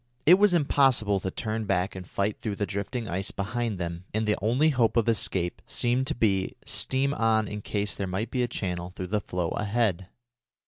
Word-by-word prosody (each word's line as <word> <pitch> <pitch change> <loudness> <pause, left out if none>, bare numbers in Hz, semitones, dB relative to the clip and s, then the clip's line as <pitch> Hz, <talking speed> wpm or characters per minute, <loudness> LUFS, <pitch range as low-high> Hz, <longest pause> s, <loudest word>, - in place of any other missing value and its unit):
It 180 +4 +8
was 205 -3 +5
impossible 135 - +3
to 95 - -3
turn 110 +3 -3
back 95 -1 0
and 90 -2 -7
fight 100 +1 -1
through 105 -3 -3
the 100 - -1
drifting 100 +5 -4
ice 95 +3 -2
behind 110 +1 -2
them, 85 0 -5
and 110 0 +1
the 105 - +3
only 125 +9 +3
hope 120 -5 +2
of 115 - +3
escape 95 -5 0
seemed 125 +2 +1
to 155 - -1
be 100 -5 +2
to - - -13 0.2
steam 135 +2 +1
on 110 -3 +2
in 105 +1 -5
case 105 0 -2
there 100 - -3
might 100 +6 -3
be 125 - 0
a 120 - +1
channel 90 -5 -4
through 95 - -4
the 105 - +2
floe 90 -4 -2
ahead. 105 -4 0
105 Hz, 210 wpm, -27 LUFS, 95-120 Hz, 0.2 s, It